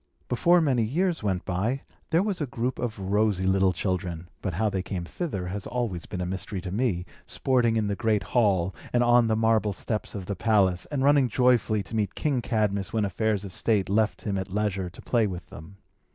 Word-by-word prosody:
Before 170 +8 +4
many 135 -6 +2
years 165 - 0
went 95 -4 -1
by, 110 +9 -1 0.3
there 165 +3 +3
was 200 -5 -2
a 145 - -1
group 125 0 -3
of 115 -3 -3
rosy 100 0 +1
little 95 0 +3
children 90 -2 -3
(but 95 -4 -3
how 110 +5 +1
they 95 -3 -1
came 90 -2 -4
thither 100 - -4
has 100 +2 -4
always 115 -8 -3
been 90 - -4
a - - -1
mystery 95 +2 -4
to 90 - -6
me) 100 -5 0 0.2
sporting 120 -3 +1
in 110 -1 +1
the 100 -1 -1
great 110 -1 +1
hall, 95 -6 +2 0.2
and 120 0 +4
on 120 -1 +5
the 110 - +2
marble 110 -2 +2
steps 110 +3 -3
of 95 -3 -5
the 100 - -3
palace, 95 -4 +2
and 140 -3 -1
running 140 -2 +4
joyfully 115 -3 +2
to 115 - -8
meet 105 -3 -1
King 140 -5 0
Cadmus 100 -5 0
when 110 -2 +1
affairs 105 +1 -1
of 95 - -8
state 105 -4 +1
left 110 +2 +1
him 100 -3 -1
at 95 - -5
leisure 100 -2 -1
to 90 - -13
play 115 -3 +2
with 90 -2 -6
them. 90 +6 -11
105 Hz, 210 wpm, -26 LUFS, 95-120 Hz, 0.3 s, on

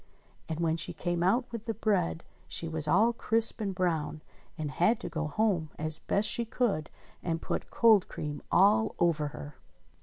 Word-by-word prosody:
And 160 0 -3
when 165 -1 +1
she 165 - -1
came 175 -1 -2
out 230 +8 +2
with 230 -2 -6
the 225 - -3
bread 190 -6 0 0.2
she 165 - +1
was 160 -2 -2
all 215 +9 +4
crisp 225 0 +2
and 195 -3 -2
brown 160 -4 -1 0.3
and 155 -3 -4
had 210 +9 +2
to - - -5
go 160 -2 -3
home 175 -1 0
as 155 0 +1
best 205 +2 0
she 235 - +1
could 220 -9 -1 0.3
and 165 -2 -2
put - - -4
cold 220 -5 +4
cream 150 -1 -6
all 210 +4 +4
over 160 -3 +1
her 145 -1 -9
175 Hz, 180 wpm, -29 LUFS, 155-220 Hz, 0.3 s, all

